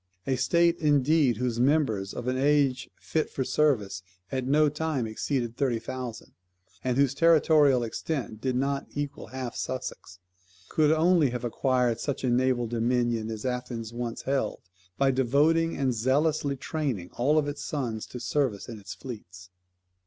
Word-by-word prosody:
A 135 - +1
state 170 +6 +2
indeed 145 -4 +3
whose 120 -1 -1
members, 125 -8 +2
of 125 - -6
an 130 - +1
age 135 -1 +2
fit 155 -1 -1
for 135 - -2
service, 110 -11 +1 0.3
at 130 -1 -2
no 150 +2 +4
time 150 -3 -1
exceeded 120 +2 -2
thirty 130 -4 +1
thousand, 125 -1 -6 0.5
and 125 -1 0
whose 140 -2 +3
territorial 150 -4 +4
extent 115 -1 -4
did 130 -2 -1
not 140 +2 -1
equal 145 -1 -4
half 130 -2 -5
Sussex, 130 -7 -5 0.5
could 155 -1 +3
only 160 -2 +4
have 125 0 -4
acquired 125 -1 +1
such 140 0 -3
a 125 - +1
naval 125 0 +2
dominion 120 -1 0
as 110 0 -5
Athens 120 -3 -4
once 120 -1 -4
held, 135 0 -1 0.4
by 135 -1 +3
devoting, 145 +6 +2
and 135 -2 +1
zealously 140 +5 +1
training, 130 - -3
all 145 +6 +2
its 145 0 -5
sons 120 -7 -3
to 125 - -8
service 125 -5 -1
in 115 -2 -7
its 100 -1 -8
fleets. 95 -6 -10
130 Hz, 155 wpm, -27 LUFS, 120-145 Hz, 0.5 s, no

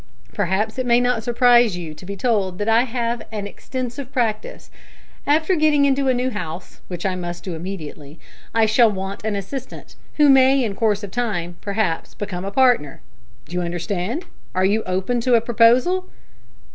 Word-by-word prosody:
Perhaps 205 +4 -1
it 255 - -2
may 235 0 +5
not 245 -2 +1
surprise 240 -3 +4
you 165 -3 -6
to 155 - -13
be 200 - -5
told 195 -4 0
that 205 - -3
I 225 +2 +4
have 235 -1 -2
an 210 -2 -4
extensive 255 +5 -6
practice. 225 -5 -2 0.6
After 315 +5 +3
getting 305 -3 +3
into 275 0 +2
a 260 - +4
new 250 +1 -1
house, 180 -4 -7
which 175 0 -6
I 190 - +1
must 175 -1 -5
do 185 - -5
immediately, 160 -4 -7 0.3
I 225 -1 +3
shall 225 +2 +5
want 195 +1 -5
an 215 -1 -1
assistant, 240 +7 -7 0.2
who 300 -1 +6
may 270 0 +5
in 215 -4 -2
course 210 0 0
of 200 - -6
time, 185 -8 -2
perhaps, 200 -5 -2
become 190 -3 -5
a - - -2
partner. 245 - +2 0.5
D'you 180 +3 -3
understand? 180 - -3 0.3
Are 185 - +2
you 210 +3 +2
open 190 +7 -1
to 245 +1 +3
a - - +6
proposal?" 240 - +3
220 Hz, 175 wpm, -21 LUFS, 185-250 Hz, 0.6 s, who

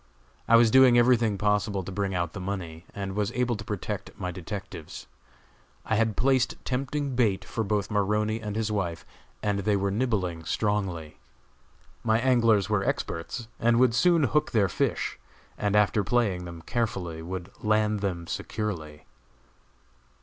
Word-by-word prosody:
I 115 - +6
was 115 -1 +6
doing 130 -1 +7
everything 120 -4 +4
possible 105 -1 +1
to 95 - -7
bring 95 0 -2
out 85 -1 -1
the - - -6
money, 90 -4 -5
and 100 -1 -4
was 105 +1 0
able 125 -1 0
to 105 - -7
protect 105 -5 -5
my 90 - -3
detectives. 90 -2 -7 0.8
I - - -1
had 110 -1 +1
placed 130 0 +2
tempting 140 +1 -2
bait 110 -6 +1
for 115 - -2
both 105 0 -1
Maroney 105 +2 +1
and 105 -1 -4
his 110 -1 -1
wife, 90 -5 -2 0.4
and 105 -1 0
they 100 +1 +1
were 100 0 0
nibbling 100 -7 -1
strongly. 95 -5 -2 0.8
My 110 -1 +3
anglers 115 -5 +3
were 105 -2 +1
experts, 100 +7 -3
and 115 0 +3
would 125 -2 +4
soon 170 +5 +4
hook 150 +3 +1
their 100 -4 +3
fish, - - -1 0.4
and 105 -1 0
after 105 0 +3
playing 100 -5 +1
them 85 -1 -9
carefully 95 -9 -2
would 90 +2 -6
land 105 -1 +2
them 90 -4 -2
securely. 85 -7 -4
105 Hz, 155 wpm, -27 LUFS, 95-115 Hz, 0.8 s, doing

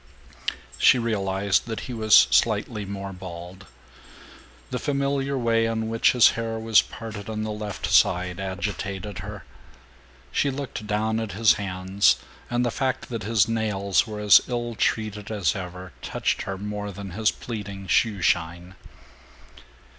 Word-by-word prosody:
She - - +6
realized 100 -3 0
that 110 -3 -4
he 125 - -6
was 110 -2 +6
slightly 110 -1 +1
more 100 0 -6
bald. 90 0 -9 1.0
The 125 - -2
familiar 140 -1 -1
way 115 -2 +2
in 110 -1 -2
which 115 0 +3
his 125 -2 +7
hair 115 -1 -3
was 110 -1 +4
parted 110 -4 -8
on 110 -1 -3
the 110 - -3
left 105 -2 -5
side 90 0 +3
agitated 95 0 -4
her. 100 -2 -8 0.9
She 140 - +1
looked 135 -5 -5
down 110 +1 0
at 110 -2 -4
his 110 +2 +5
hands, 95 +1 +2 0.3
and 120 0 +1
the 120 - 0
fact 130 0 -2
that 115 -3 -4
his 110 +1 +2
nails 105 -3 +1
were 105 -1 -6
as 105 -1 +7
ill 120 -1 -3
treated 105 -2 -1
as 100 -8 0
ever 90 -1 -7
touched - - -1
her 95 - -3
more 105 +1 -5
than 100 0 -8
his 110 +4 +1
pleading 100 -4 -6
shoe 100 -1 +1
shine. 85 +3 0
105 Hz, 145 wpm, -25 LUFS, 95-115 Hz, 1.0 s, his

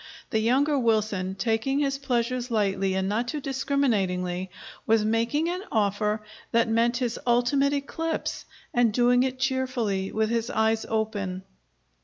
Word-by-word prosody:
The 220 - +2
younger 270 +6 +2
Wilson, 215 -5 0
taking 225 +6 0
his 275 -1 0
pleasures 250 -1 -1
lightly 195 -4 +1
and 190 0 0
not 220 +4 -1
too 300 +4 -3
discriminatingly, 200 -10 0 0.4
was 220 -1 +3
making 230 +8 +1
an 360 +2 -2
offer 210 0 0 0.3
that 230 0 +3
meant 230 +2 +2
his 240 -2 -2
ultimate 245 +4 +3
eclipse, 320 +3 -3 0.3
and 240 -2 +3
doing 245 +2 +4
it 260 0 -1
cheerfully, 255 -7 -1
with 220 +1 0
his 235 0 0
eyes 220 0 +1
open. 205 -4 -2
230 Hz, 140 wpm, -26 LUFS, 210-260 Hz, 0.4 s, doing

